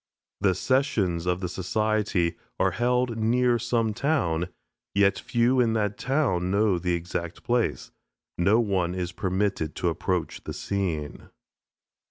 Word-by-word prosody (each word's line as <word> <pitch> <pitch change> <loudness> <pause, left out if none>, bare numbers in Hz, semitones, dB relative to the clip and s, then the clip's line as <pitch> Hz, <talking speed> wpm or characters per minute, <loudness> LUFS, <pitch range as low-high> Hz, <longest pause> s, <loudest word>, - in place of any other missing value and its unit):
The 95 -2 +2
sessions 95 -9 +1
of 90 +1 0
the 90 - -1
society 95 -1 0 0.2
are - - +3
held 125 -1 0
near 120 +2 +2
some 115 -1 0
town, 90 - 0 0.5
yet 100 -1 +3
few 120 +1 +2
in 115 -2 +3
that 105 -2 0
town 125 -11 +1
know 100 -2 +2
the 90 0 0
exact 85 0 -5
place. 120 -1 0 0.4
No 100 +6 +3
one 95 -6 0
is 90 -1 -3
permitted 95 -3 -1
to 90 - 0
approach 85 0 -2
the - - -5
scene. 85 -7 -3
100 Hz, 135 wpm, -26 LUFS, 90-115 Hz, 0.5 s, are